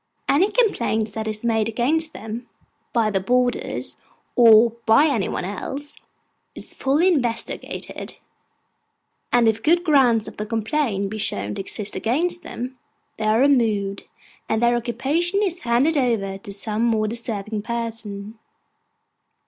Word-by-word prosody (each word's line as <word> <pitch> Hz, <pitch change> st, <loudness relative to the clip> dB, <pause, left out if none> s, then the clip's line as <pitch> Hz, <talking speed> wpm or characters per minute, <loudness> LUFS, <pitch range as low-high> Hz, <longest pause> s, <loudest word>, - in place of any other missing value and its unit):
Any 355 Hz, +9 st, +3 dB
complaint 235 Hz, -, +1 dB
that 220 Hz, 0 st, -4 dB
is 215 Hz, +1 st, -3 dB
made 225 Hz, -1 st, +1 dB
against 305 Hz, +8 st, 0 dB
them, 225 Hz, -1 st, -7 dB, 0.4 s
by 225 Hz, -3 st, +1 dB
the 195 Hz, -, +1 dB
boarders, 245 Hz, +5 st, -1 dB, 0.4 s
or 230 Hz, -1 st, +7 dB, 0.2 s
by 225 Hz, +7 st, +6 dB
any 250 Hz, -11 st, +1 dB
one -, -, -3 dB
else, 270 Hz, +9 st, -6 dB, 0.6 s
is -, -, -6 dB
fully 290 Hz, +7 st, +2 dB
investigated; 245 Hz, -10 st, -2 dB, 1.1 s
and 240 Hz, -2 st, +4 dB
if 220 Hz, 0 st, +1 dB
good 340 Hz, +6 st, +3 dB
ground 255 Hz, -, +3 dB
of -, -, -10 dB
complaint 215 Hz, -1 st, -1 dB
be 215 Hz, -, -5 dB
shown 100 Hz, -, -2 dB
to -, -, -4 dB
exist 200 Hz, +1 st, -2 dB
against 310 Hz, -, 0 dB
them, 255 Hz, -5 st, -7 dB, 0.4 s
they 220 Hz, -, -3 dB
are 215 Hz, +3 st, +3 dB
removed, 220 Hz, -8 st, +2 dB, 0.4 s
and 220 Hz, +1 st, +1 dB
their 240 Hz, 0 st, +4 dB
occupation 275 Hz, -, 0 dB
is 360 Hz, -3 st, -2 dB
handed 250 Hz, +7 st, +2 dB
over 220 Hz, -8 st, 0 dB
to 200 Hz, -, -9 dB
some 210 Hz, +2 st, -1 dB
more 220 Hz, -2 st, +2 dB
deserving 215 Hz, -2 st, -3 dB
person. 225 Hz, -2 st, -5 dB
230 Hz, 135 wpm, -22 LUFS, 215-270 Hz, 1.1 s, or